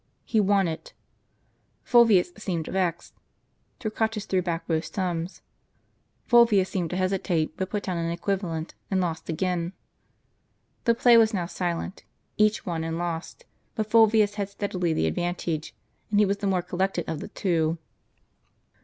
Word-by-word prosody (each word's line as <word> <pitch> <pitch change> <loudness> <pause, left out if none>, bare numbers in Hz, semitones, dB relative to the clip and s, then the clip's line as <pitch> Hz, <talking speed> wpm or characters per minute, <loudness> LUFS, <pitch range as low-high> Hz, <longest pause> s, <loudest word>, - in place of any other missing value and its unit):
He 220 - +1
won 200 -2 +3
it. 160 -1 -6 0.9
Fulvius 225 -7 +5
seemed 180 -6 -3
vexed. 175 -2 -2 0.7
Torquatus 220 -2 -2
threw 185 -3 +1
back 170 -1 -3
both 160 -1 0
sums. 180 -2 -3 0.8
Fulvius 230 -6 +5
seemed 175 -4 -1
to - - -3
hesitate, 185 -4 0
but 190 +1 -3
put 210 -1 -2
down 180 -2 -2
an 165 0 -1
equivalent, 170 -2 -2 0.2
and 190 - +1
lost 170 -3 -2
again. 175 +1 -1 1.1
The 235 -2 +4
play 240 0 +6
was 220 -1 +4
now 180 -3 -1
silent: 175 +1 -3 0.3
each 215 0 +2
won 165 -3 -2
and 165 0 -3
lost; 170 -1 -4 0.3
but 215 -1 -3
Fulvius 220 -2 +5
had 200 -1 -2
steadily 185 -4 -2
the 155 - +1
advantage, 165 - -2 0.3
and 205 -1 +2
he 210 - +6
was 200 +1 0
the 200 0 -2
more 185 -2 +1
collected 180 0 -1
of 160 -2 -3
the - - -6
two. 170 -5 0
185 Hz, 150 wpm, -26 LUFS, 170-205 Hz, 1.1 s, play